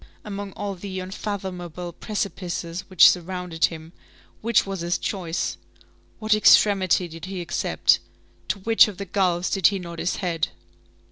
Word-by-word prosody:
Among 200 -1 -5
all 205 -1 -4
the 190 0 -6
unfathomable 185 -3 -5
precipices 180 -3 -4
which 185 -3 +8
surrounded 180 -2 0
him, 160 0 -7 0.5
which 230 0 +3
was 195 -1 -4
his 170 +2 0
choice? 175 -5 -3 0.6
What 215 0 +1
extremity 195 -4 +5
did 165 0 -9
he 190 -1 -5
accept? 170 -4 +2 0.5
To - - -1
which 225 +3 +6
of 205 -4 -7
the 200 - -5
gulfs 180 -2 0
did 195 -3 +4
he 200 - 0
nod 170 -2 -8
his 175 - -1
head? 170 -4 -1
185 Hz, 145 wpm, -24 LUFS, 175-200 Hz, 0.6 s, which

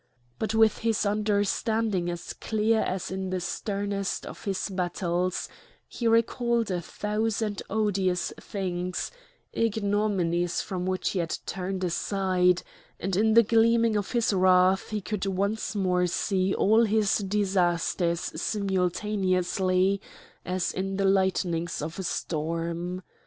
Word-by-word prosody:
But 220 0 -1
with 220 -1 +4
his 225 -2 +1
understanding 205 -1 0
as 175 0 -5
clear 220 +1 +1
as 185 -2 -2
in 190 0 -3
the 185 0 -1
sternest 200 +2 -3
of - - -9
his 195 -2 -1
battles, 180 -1 -1 0.4
he 235 - -3
recalled 230 -1 +2
a 175 -1 -1
thousand 210 +2 -2
odious 195 -4 0
things, 180 -3 -3 0.4
ignominies 200 -6 +1
from 185 -1 -3
which 185 0 0
he 190 - -1
had 165 -2 -1
turned 190 +1 -3
aside; 180 0 +1 0.4
and 190 0 -2
in 220 +3 +3
the 230 - +8
gleaming 230 0 +3
of 205 +2 -2
his 235 -3 +2
wrath 185 0 +4
he 215 -1 -2
could 200 0 -3
once 200 +3 -1
more 180 -2 +2
see 190 +1 0
all 220 +3 +4
his 215 -1 +2
disasters 180 -4 +1 0.2
simultaneously 190 -1 +1 0.4
as 180 0 -1
in 195 +1 -2
the 195 - +1
lightnings 185 -3 +1
of 160 +5 -5
a - - -3
storm. 170 +2 -3
195 Hz, 125 wpm, -27 LUFS, 180-210 Hz, 0.4 s, the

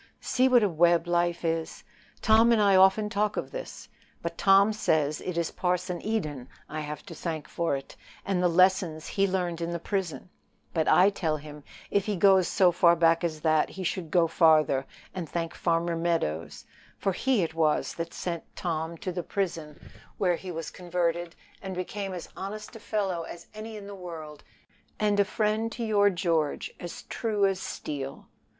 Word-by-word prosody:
See 255 0 +2
what 245 -3 +5
a - - +4
web 170 0 +3
life 175 0 0
is! 165 0 -2 0.4
Tom 225 +2 +6
and 230 - +4
I 200 -2 +5
often 190 +3 +5
talk 210 -1 -1
of - - -3
this. - - -7 0.4
But 170 0 -3
Tom 195 +3 +5
says 155 -7 +1
it 180 -2 -4
is 170 -1 0
Parson 180 -1 -1
Eden 150 - -3 0.2
I 155 - -5
have 150 0 -6
to - - -9
thank 160 -2 -4
for 170 -4 -1
it, 135 0 -8 0.3
and 190 -2 0
the 180 - +4
lessons 175 -2 +3
he 195 0 +2
learned 180 -3 -2
in 170 - -2
the 170 - -2
prison; 180 -3 -3 0.4
but 160 -2 +1
I 195 +3 +6
tell 160 -6 -1
him 150 0 -11 0.3
if 200 0 +1
he 210 - 0
goes 190 -1 +5
so 185 -4 +4
far 170 0 +5
back 165 0 +3
as 155 -3 -2
that, 155 -1 +2
he 190 - -7
should 175 -2 -2
go 170 0 +4
farther, 155 -5 +3 0.3
and 175 -5 -5
thank 165 -1 -3
Farmer 170 0 0
Meadows, 165 - -2 0.3
for 195 - 0
he 240 +2 +1
it 160 - -3
was 160 -2 +1
that 165 0 -5
sent 170 -2 -5
Tom 165 -1 -3
to 185 - -4
the 175 0 -3
prison, 165 -5 -3 0.4
where 180 -3 +2
he 185 +2 -8
was 165 -2 -5
converted, 175 -1 -2 0.3
and 190 -1 -5
became 195 +2 -4
as 180 -2 -6
honest 210 +4 -7
a - - -8
fellow 200 -5 -1
as 170 +1 -9
any 215 +1 -7
in 205 - -9
the 200 - -8
world, 165 -5 -9 0.6
and 210 -1 +2
a 200 - +5
friend 215 +2 0
to 240 - -4
your 205 -2 +4
George 170 -5 -1
as 175 - -7
true 215 -4 0
as 195 -1 +1
steel." 140 -6 -5
175 Hz, 185 wpm, -28 LUFS, 165-195 Hz, 0.6 s, Tom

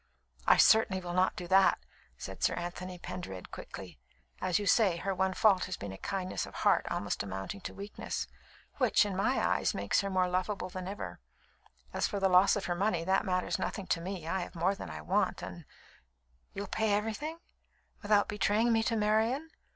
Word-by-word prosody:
"I - - +7
certainly 220 -3 +5
will 175 -1 -5
not 185 +1 +2
do 180 - -6
that," 195 0 +5 0.4
said - - -8
Sir - - +2
Anthony 180 +1 -5
Pendered 175 - -7
quickly. - - -9 0.4
"As 185 -1 +2
you 205 - -2
say, 200 -3 +4
her 195 +3 -2
one 190 0 0
fault 200 -4 +4
has 185 - -4
been 100 -1 -6
a 95 - -8
kindness 190 -2 -3
of - - -12
heart - - +2
almost 100 - -2
amounting 100 - -5
to - - -6
weakness, 200 +1 -4 0.5
which, - - +4
in 200 -2 -3
my 220 +8 +1
eyes, - - +1
makes - - +1
her 200 - -3
more 185 -1 +2
lovable 185 +1 -2
than 185 0 -6
ever. 95 - -6 0.7
As - - +1
for 200 - -3
the 195 0 +3
loss 185 +2 +6
of 205 - -3
her 175 - 0
money, 175 -2 0
that 190 +2 +2
matters 185 -1 0
nothing 195 - -3
to 165 - +1
me. 180 -2 -5
I 190 +3 0
have 180 0 -6
more 175 +4 +2
than 195 - -8
I 80 -1 -7
want, 75 - 0
and - - -8 0.5
" - - -41
"You'll 200 +1 -3
pay 220 +1 0
everything, 225 +10 -3 0.6
without 205 0 +3
betraying 210 +3 +2
me 225 - +3
to 225 +1 0
Marian? 225 +8 +1
190 Hz, 195 wpm, -31 LUFS, 180-205 Hz, 0.7 s, I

